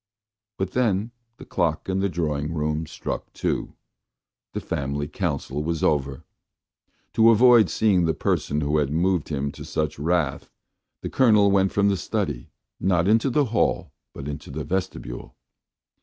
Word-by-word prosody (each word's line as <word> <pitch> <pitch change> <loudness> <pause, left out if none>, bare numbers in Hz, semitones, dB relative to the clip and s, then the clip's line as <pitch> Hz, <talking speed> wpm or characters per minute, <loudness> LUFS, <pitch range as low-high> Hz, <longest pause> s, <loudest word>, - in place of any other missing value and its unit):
But 95 -1 -2
then 115 -3 0 0.3
the - - -11
clock 85 -4 -1
in 95 0 0
the 100 0 +1
drawing 75 -2 -2
room 75 +1 -1
struck - - -5
two. - - -2 0.8
The - - -2
family 70 +1 -3
council 75 -4 -3
was 80 0 -2
over. 70 -3 0 0.9
To 115 0 +6
avoid 115 -3 +6
seeing 95 -2 +2
the 80 -1 +1
person 75 0 0
who 75 +1 +1
had 70 -2 0
moved 85 +1 +1
him 70 -2 -2
to - - -10
such 75 -3 -3
wrath, 80 -2 0 0.5
the - - -3
Colonel 105 -6 +5
went 95 -1 +3
from 100 0 +2
the 100 - +1
study, 85 - -3 0.3
not 90 -2 +2
into 115 +5 +3
the 140 +3 +2
hall, - - +1 0.2
but 70 - -8
into 75 0 -6
the 75 +2 -5
vestibule. 90 -10 -4
85 Hz, 155 wpm, -24 LUFS, 75-100 Hz, 0.9 s, To